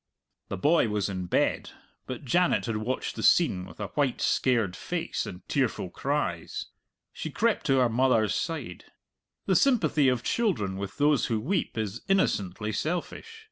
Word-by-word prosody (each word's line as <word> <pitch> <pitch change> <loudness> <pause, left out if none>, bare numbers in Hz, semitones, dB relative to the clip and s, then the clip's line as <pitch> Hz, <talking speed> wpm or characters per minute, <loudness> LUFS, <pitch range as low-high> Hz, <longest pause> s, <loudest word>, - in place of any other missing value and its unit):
The 100 - -4
boy 150 - +3
was 105 -1 -1
in 95 -2 -4
bed, - - 0 0.3
but 130 +2 -6
Janet 175 +8 +2
had 115 -2 -2
watched 115 +4 -3
the - - -5
scene 95 - +3
with 90 - -14
a 105 - -4
white, 140 -4 0
scared 115 -8 +1
face - - -3
and 90 - -9
tearful 125 -9 -1
cries. 135 - -2 0.5
She 160 - -5
crept 225 +8 0
to 135 -2 +4
her 125 -1 +4
mother's 115 -3 +2
side. 150 - -4 0.6
The 190 - +2
sympathy 165 - +3
of 125 -2 +1
children 110 - 0
with 100 -1 -6
those 145 -1 +3
who 115 -2 0
weep 165 - -2
is 110 +1 -3
innocently 105 - +1
selfish. 180 - -4
125 Hz, 160 wpm, -27 LUFS, 105-155 Hz, 0.6 s, to